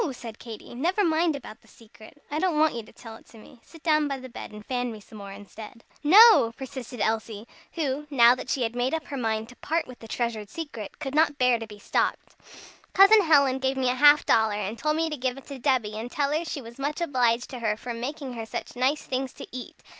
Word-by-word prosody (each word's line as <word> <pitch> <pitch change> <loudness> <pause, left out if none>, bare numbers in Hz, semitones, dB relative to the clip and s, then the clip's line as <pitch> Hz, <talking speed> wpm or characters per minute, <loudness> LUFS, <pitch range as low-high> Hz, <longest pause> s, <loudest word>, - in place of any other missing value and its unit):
said 230 -3 -9
Katy; 225 -1 -10
"never 350 - 0
mind 320 -1 +2
about 245 -5 -10
the - - -24
secret. 225 +5 -17
I 300 - -1
don't 350 -3 +1
want 310 0 +3
you 235 - -4
to 215 - -16
tell 225 -2 -11
it - - -22
to 230 - -16
me. 235 +3 -16
Sit 330 -2 -17
down 305 -2 +3
by 275 -1 -3
the 260 0 -10
bed, 235 - -9
and 210 0 -11
fan 245 -1 -2
me 220 - -9
some 210 +1 -13
more 200 -1 -8
instead." 210 +3 -11 0.2
"No!" 395 - +8
persisted 260 -2 -8
Elsie, 220 0 -2 0.3
who, 295 -2 -2
now 240 -4 +6
that 255 0 -7
she 255 +1 0
had 230 +1 -2
made 250 +5 0
up 320 -2 -5
her 285 - -4
mind 220 -3 -2
to 250 - -14
part 325 +2 -1
with 255 -1 -12
the 225 - -11
treasured 220 -3 -3
secret, 235 -7 -7
could 270 - -5
not 305 -1 +3
bear 250 -3 +3
to 225 - -7
be 210 -1 -12
stopped. 205 - -2 0.6
"Cousin 400 +3 +7
Helen 280 -6 +4
gave 265 0 -1
me 255 -1 +2
a - - 0
half 290 +3 +6
dollar, 220 -2 +3
and 210 +1 -3
told 305 0 0
me 325 +1 0
to 305 -2 -4
give 255 0 -2
it 275 - -12
to 275 -2 -8
Debby, 250 -5 +1
and 220 +3 -5
tell 285 +2 -1
her 315 +2 0
she 290 -4 -5
was 235 +3 -12
much 290 +4 -2
obliged 250 -7 +1
to 255 - -6
her 215 -2 -1
for 240 +2 -6
making 260 +3 -5
her 225 -2 -6
such - - -6
nice 260 +4 +1
things 260 0 -3
to - - -9
eat. 250 0 -9
255 Hz, 250 wpm, -26 LUFS, 230-295 Hz, 0.6 s, No